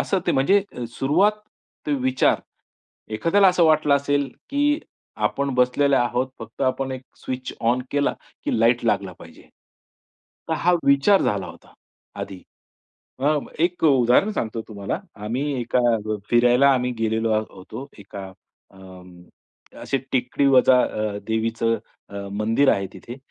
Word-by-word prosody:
असं 195 Hz, -, 0 dB
ते -, -, +2 dB
म्हणजे 190 Hz, +10 st, +3 dB, 0.3 s
सुरुवात 160 Hz, -, +2 dB, 0.5 s
ते 150 Hz, -, 0 dB
विचार. 130 Hz, 0 st, +2 dB, 0.7 s
एखाद्याला 190 Hz, -, +4 dB
असं 180 Hz, -2 st, +3 dB
वाटलं 155 Hz, -2 st, +4 dB
असेल, 140 Hz, -1 st, 0 dB, 0.2 s
की 290 Hz, +1 st, +2 dB, 0.5 s
आपण 140 Hz, 0 st, 0 dB
बसलेले 125 Hz, +3 st, +3 dB
आहोत. 125 Hz, +1 st, 0 dB
फक्त 115 Hz, +4 st, -8 dB
आपण 130 Hz, +1 st, 0 dB
एक 130 Hz, 0 st, -6 dB, 0.2 s
स्विच 130 Hz, 0 st, -4 dB
ऑन 120 Hz, +2 st, +1 dB
केला, 145 Hz, 0 st, +1 dB, 0.3 s
की -, -, 0 dB
लाईट 120 Hz, +1 st, +3 dB
लागला 100 Hz, -5 st, 0 dB
पाहिजे. -, -, -14 dB, 1.1 s
तर -, -, +1 dB
हा 180 Hz, -, +3 dB
विचार 140 Hz, +9 st, +4 dB
झाला 100 Hz, -3 st, -1 dB
होता, 85 Hz, 0 st, -14 dB, 0.5 s
आधी. 95 Hz, -2 st, -7 dB, 0.8 s
अ, 145 Hz, +3 st, +2 dB, 0.2 s
एक 175 Hz, +1 st, 0 dB
उदाहरण 135 Hz, -, +4 dB
सांगतो 115 Hz, -, -3 dB
तुम्हाला. 100 Hz, -, -4 dB, 0.2 s
आम्ही 120 Hz, +6 st, -2 dB, 0.2 s
एका 120 Hz, +1 st, 0 dB, 0.5 s
फिरायला 120 Hz, +3 st, +5 dB
आम्ही 125 Hz, -1 st, 0 dB
गेलेलो 110 Hz, 0 st, 0 dB, 0.2 s
होतो. 110 Hz, +8 st, -10 dB
एका 100 Hz, -1 st, -9 dB, 0.4 s
अं, 90 Hz, -2 st, -14 dB, 0.6 s
अशी 135 Hz, -, -1 dB
टेकडीवजा 130 Hz, 0 st, +4 dB
अ, 105 Hz, -1 st, -2 dB
देवीचं 115 Hz, +1 st, 0 dB, 0.3 s
अ, 100 Hz, 0 st, -7 dB
मंदिर 110 Hz, +7 st, +1 dB
आहे 100 Hz, 0 st, -1 dB
तिथे. 115 Hz, +6 st, -10 dB
125 Hz, 130 wpm, -23 LUFS, 110-140 Hz, 1.1 s, फिरायला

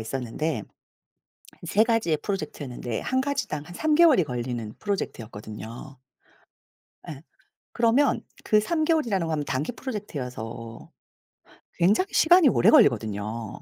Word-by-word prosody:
있었는데 125 Hz, +2 st, -3 dB, 1.0 s
3 210 Hz, +6 st, +3 dB
가지의 225 Hz, -9 st, +1 dB
프로젝트였는데 145 Hz, -, -4 dB
1 260 Hz, +1 st, 0 dB
가지당 260 Hz, -, -3 dB
한 175 Hz, -, -11 dB
3 310 Hz, +6 st, +1 dB
개월이 305 Hz, -, +6 dB
걸리는 120 Hz, -4 st, -4 dB
프로젝트였거든요. 115 Hz, -, -6 dB, 1.1 s
예 145 Hz, -2 st, -8 dB, 0.5 s
그러면 240 Hz, +4 st, +2 dB, 0.2 s
그 215 Hz, -1 st, +4 dB
3 315 Hz, +8 st, 0 dB
개월이라는 240 Hz, -, +1 dB
건 155 Hz, -2 st, -2 dB
단기 145 Hz, -, -2 dB
프로젝트여서 125 Hz, -, -7 dB, 0.9 s
굉장히 205 Hz, -, +3 dB
시간이 345 Hz, -1 st, +6 dB
오래 -, -, +4 dB
걸리거든요. 110 Hz, -, +2 dB
155 Hz, 280 characters per minute, -25 LUFS, -, 1.1 s, 개월이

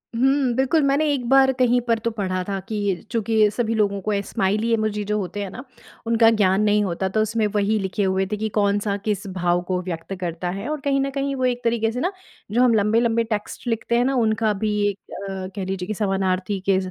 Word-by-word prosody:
हुँ, 265 Hz, +1 st, +2 dB
बिल्कुल, 265 Hz, +5 st, +2 dB
मैंने 280 Hz, +3 st, +2 dB
एक 250 Hz, -4 st, -3 dB
बार 270 Hz, 0 st, +6 dB
कहीं 245 Hz, -1 st, +4 dB
पर 230 Hz, -1 st, +2 dB
तो 230 Hz, +1 st, -2 dB
पढ़ा 185 Hz, -4 st, -2 dB
था 195 Hz, -, -1 dB
कि 205 Hz, -4 st, -2 dB
चूँकि 220 Hz, -2 st, +2 dB
सभी 230 Hz, 0 st, -1 dB
लोगों 200 Hz, -2 st, +1 dB
को 210 Hz, +3 st, -2 dB
स्माइली 210 Hz, +4 st, 0 dB
इमोजी 215 Hz, -1 st, 0 dB
जो 210 Hz, +1 st, 0 dB
होते 195 Hz, +1 st, -4 dB
हैं 195 Hz, -, -5 dB
ना, 250 Hz, -, -8 dB, 0.4 s
उनका 230 Hz, 0 st, +5 dB
ज्ञान 205 Hz, -2 st, +3 dB
नहीं 210 Hz, 0 st, +3 dB
होता, 190 Hz, 0 st, -2 dB
तो 215 Hz, +3 st, +1 dB
उसमें 220 Hz, 0 st, 0 dB
वही 205 Hz, +1 st, +2 dB
लिखे 195 Hz, +2 st, -2 dB
हुए 190 Hz, 0 st, +1 dB
थे 210 Hz, -, -1 dB
कि 220 Hz, +1 st, -2 dB
कौन-सा 205 Hz, 0 st, +1 dB
किस 205 Hz, -1 st, -1 dB
भाव 180 Hz, -2 st, 0 dB
को 180 Hz, -1 st, 0 dB
व्यक्त 175 Hz, 0 st, -5 dB
करता 175 Hz, 0 st, -3 dB
है। 195 Hz, +6 st, -4 dB
और 305 Hz, 0 st, -2 dB
कहीं 275 Hz, 0 st, +1 dB
न 275 Hz, -, 0 dB
कहीं 275 Hz, 0 st, -2 dB
वो 260 Hz, -1 st, 0 dB
एक 245 Hz, 0 st, -1 dB
तरीके 230 Hz, -1 st, +1 dB
से 250 Hz, -, -4 dB
ना 360 Hz, +6 st, 0 dB, 0.4 s
जो 240 Hz, +3 st, +2 dB
हम 245 Hz, -2 st, +4 dB
लंबे-लंबे 225 Hz, +2 st, +2 dB
टेक्स्ट 215 Hz, +1 st, -5 dB
लिखते 230 Hz, 0 st, 0 dB
हैं 245 Hz, -, +2 dB
ना, 270 Hz, +1 st, +1 dB
उनका 220 Hz, -2 st, +2 dB
भी 210 Hz, +2 st, -1 dB, 0.2 s
एक 200 Hz, -, -5 dB, 0.3 s
अ, 190 Hz, -1 st, -5 dB
कह 195 Hz, -2 st, -3 dB
लीजिये 190 Hz, -1 st, -4 dB
की -, -, -3 dB
एक 215 Hz, -, -4 dB
समानार्थी 190 Hz, -1 st, 0 dB
के 190 Hz, -, +5 dB
215 Hz, 230 wpm, -22 LUFS, 195-235 Hz, 0.4 s, बार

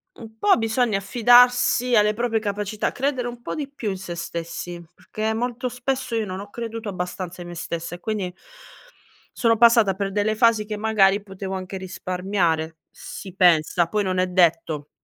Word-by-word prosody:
u -, -, -15 dB
un 220 Hz, 0 st, -13 dB
po' 390 Hz, -, +4 dB
bisogna 225 Hz, -1 st, +1 dB
affidarsi 245 Hz, +3 st, +4 dB
alle 210 Hz, -1 st, +4 dB
proprie 230 Hz, 0 st, 0 dB
capacità, 210 Hz, 0 st, -2 dB
credere 260 Hz, -2 st, -1 dB
un 240 Hz, 0 st, -8 dB
po' -, -, -5 dB
di 290 Hz, -2 st, -4 dB
più 240 Hz, -7 st, -4 dB
in 190 Hz, -, -4 dB
se 185 Hz, -2 st, -7 dB
stessi, 170 Hz, +1 st, -6 dB
perché 220 Hz, +1 st, -3 dB
molto 245 Hz, +2 st, -2 dB
spesso 255 Hz, 0 st, -3 dB
io 225 Hz, -1 st, 0 dB
non 185 Hz, -1 st, -5 dB
ho 200 Hz, -, -10 dB
creduto 225 Hz, -1 st, -6 dB
abbastanza 180 Hz, -1 st, -5 dB
in 175 Hz, -, -8 dB
me 175 Hz, -, -8 dB
stessa 170 Hz, +1 st, -5 dB
e -, -, -13 dB
quindi, 195 Hz, -2 st, -3 dB, 1.0 s
sono 230 Hz, -1 st, +2 dB
passata 230 Hz, -3 st, +5 dB
per 195 Hz, 0 st, -3 dB
delle 210 Hz, +2 st, 0 dB
fasi 225 Hz, -1 st, +3 dB
che 210 Hz, 0 st, -4 dB
magari 205 Hz, -2 st, +3 dB
potevo 195 Hz, -1 st, -7 dB
anche 190 Hz, +1 st, -6 dB
risparmiare, 180 Hz, -3 st, -2 dB
si 190 Hz, -3 st, -9 dB
pensa, 175 Hz, -2 st, +4 dB
poi 210 Hz, +3 st, 0 dB
non 185 Hz, -1 st, -1 dB
è 185 Hz, -, +2 dB
detto. 165 Hz, -4 st, +1 dB
205 Hz, 180 wpm, -23 LUFS, 185-230 Hz, 1.0 s, passata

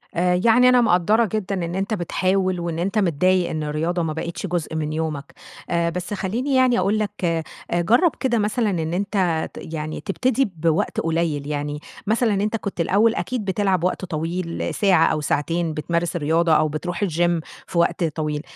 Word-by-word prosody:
آآ، 180 Hz, +1 st, +2 dB
يعني 245 Hz, +2 st, +6 dB
أنا 250 Hz, -1 st, +5 dB
مقدَّرة 215 Hz, +2 st, +3 dB
جدًا 200 Hz, -2 st, -1 dB
إن 170 Hz, +1 st, -4 dB
أنتَ 195 Hz, +3 st, -1 dB
بتحاول 185 Hz, 0 st, 0 dB
وإن 170 Hz, -1 st, -3 dB
أنتَ 195 Hz, +5 st, -1 dB
متضايق 185 Hz, 0 st, +2 dB
إن 155 Hz, -1 st, -3 dB
الرياضة 160 Hz, +4 st, -1 dB
ما 160 Hz, -1 st, -2 dB
بقتش 170 Hz, +4 st, -4 dB
جزء 170 Hz, -3 st, -3 dB
من 155 Hz, -1 st, -2 dB
يومَك. 155 Hz, -3 st, -4 dB, 0.4 s
آآ، 170 Hz, -1 st, +1 dB
بس 180 Hz, +3 st, -4 dB
خلِّيني 230 Hz, +8 st, -1 dB
يعني 255 Hz, -3 st, +4 dB
أقول 200 Hz, +4 st, +1 dB
لَك، 210 Hz, -2 st, -1 dB
آآ 165 Hz, -1 st, 0 dB, 0.4 s
جرب 240 Hz, -, +4 dB
كده 245 Hz, -4 st, +1 dB
مثلًا 215 Hz, +1 st, +1 dB
إن 165 Hz, -3 st, -2 dB
أنتَ 185 Hz, -4 st, 0 dB
ت -, -, -12 dB, 0.2 s
يعني 155 Hz, 0 st, -4 dB
تبتدي 255 Hz, +6 st, +1 dB
بوقت 160 Hz, 0 st, 0 dB
قليل، 160 Hz, -3 st, -1 dB
يعني 145 Hz, 0 st, -3 dB, 0.3 s
مثلًا 220 Hz, +1 st, +2 dB
أنتَ 205 Hz, +3 st, 0 dB
كنت 200 Hz, -5 st, -3 dB
الأول 215 Hz, +6 st, +3 dB
أكيد 250 Hz, -5 st, -3 dB
بتلعب 190 Hz, -2 st, +1 dB
وقت 185 Hz, +1 st, -1 dB
طويل 165 Hz, +1 st, -3 dB
ساعة 185 Hz, -6 st, +4 dB
أو 155 Hz, -, 0 dB
ساعتين 165 Hz, +3 st, -1 dB
بتمارس 170 Hz, +3 st, -1 dB
الرياضة 165 Hz, +1 st, +2 dB
أو 155 Hz, 0 st, +4 dB
بتروح 170 Hz, +5 st, -3 dB
الgym 175 Hz, -1 st, +1 dB, 0.3 s
في -, -, -5 dB
وقت 170 Hz, +2 st, +2 dB
طويل. 150 Hz, -2 st, -2 dB
175 Hz, 180 wpm, -22 LUFS, 160-205 Hz, 0.4 s, يعني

